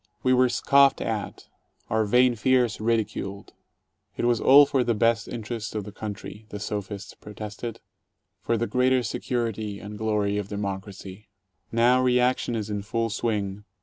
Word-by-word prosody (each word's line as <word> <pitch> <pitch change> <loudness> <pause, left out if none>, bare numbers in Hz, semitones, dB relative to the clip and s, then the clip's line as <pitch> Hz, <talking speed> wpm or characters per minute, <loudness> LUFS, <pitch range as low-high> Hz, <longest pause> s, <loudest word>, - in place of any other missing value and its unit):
We 130 - +3
were 125 0 +4
scoffed 140 +2 +4
at, - - -4 0.4
our 110 0 +1
"vain 125 +4 +4
fears" 120 -1 +1
ridiculed. 110 -3 -2 0.6
It - - -1
was 120 -1 +2
all 145 +2 +8
for 135 -2 +1
the 120 -1 0
best 115 0 +2
interests 115 -2 -5
of 105 - -2
the 105 - -9
country 105 +1 -8
— - - -33
the 105 - -6
sophists 105 0 -5
protested 105 +2 -8 0.3
— - - -54
for 115 - 0
the 115 - 0
greater 125 +1 +2
security 110 -3 -3
and 105 0 -9
glory 105 -2 0
of 100 - -5
Democracy. 100 -1 -5
II 105 +2 -22 0.5
Now 120 +2 +4
reaction 125 -1 +2
is 110 -1 -3
in 105 -1 -2
full 115 +2 -2
swing. 105 -3 -2
110 Hz, 165 wpm, -25 LUFS, 105-120 Hz, 0.6 s, all